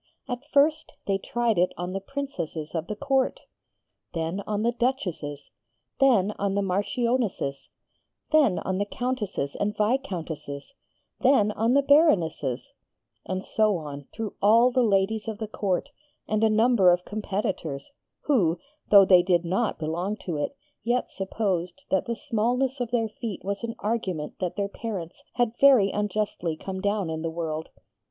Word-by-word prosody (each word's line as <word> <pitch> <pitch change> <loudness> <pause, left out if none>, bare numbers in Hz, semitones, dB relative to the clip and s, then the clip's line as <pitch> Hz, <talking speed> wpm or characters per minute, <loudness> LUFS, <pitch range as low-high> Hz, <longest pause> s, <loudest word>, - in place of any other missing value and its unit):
At 245 -2 -3
first 305 +2 +3
they 195 -1 0
tried 235 -2 0
it 180 - +2
on 180 +1 -4
the 195 - -1
Princesses 190 - -5
of 165 0 -2
the 210 - -3
Court: 270 +2 0 0.7
Then 165 +4 -2
on 210 0 -1
the 235 - +3
Duchesses: 180 - -2 0.5
Then 225 -8 +4
on 200 -1 0
the 200 - +1
Marchionesses: 205 - -1 0.6
Then 290 - +4
on 190 0 -2
the 205 - +1
Countesses 210 - -3
and 210 +1 -1
Viscountesses: 175 - -2 0.5
Then 250 -6 +4
on 225 +4 +1
the 280 - +4
Baronesses: 175 - +2 0.5
And 185 0 -3
so 215 -3 +2
on, 145 -3 -7
through 220 -2 -5
all 230 +5 +6
the 255 0 +2
ladies 210 0 +1
of 220 -2 -3
the 220 0 -4
Court, 195 -4 -1 0.4
and 215 0 0
a 220 - +5
number 220 -3 +5
of 180 0 +2
competitors, 195 - -3 0.3
who, 185 - +2 0.3
though 200 -2 +9
they 180 -2 +7
did 175 -1 +2
not 190 +6 0
belong 175 +6 -2
to 175 - -2
it, 150 - -3 0.2
yet 245 +2 0
supposed 190 -3 -2
that 190 - +2
the 235 - -2
smallness 250 +1 0
of 245 -2 -2
their 230 -1 +1
feet 215 -1 -6
was 200 +3 -3
an 230 -1 -3
argument 190 -8 -3
that 180 -2 -2
their 200 -1 -1
parents 200 -5 -6
had 240 -2 +1
very 255 -8 +6
unjustly 205 -5 -2
come 190 +2 -5
down 200 -4 0
in 160 0 -3
the 165 - -2
world. 160 -1 -4
205 Hz, 160 wpm, -26 LUFS, 175-235 Hz, 0.7 s, though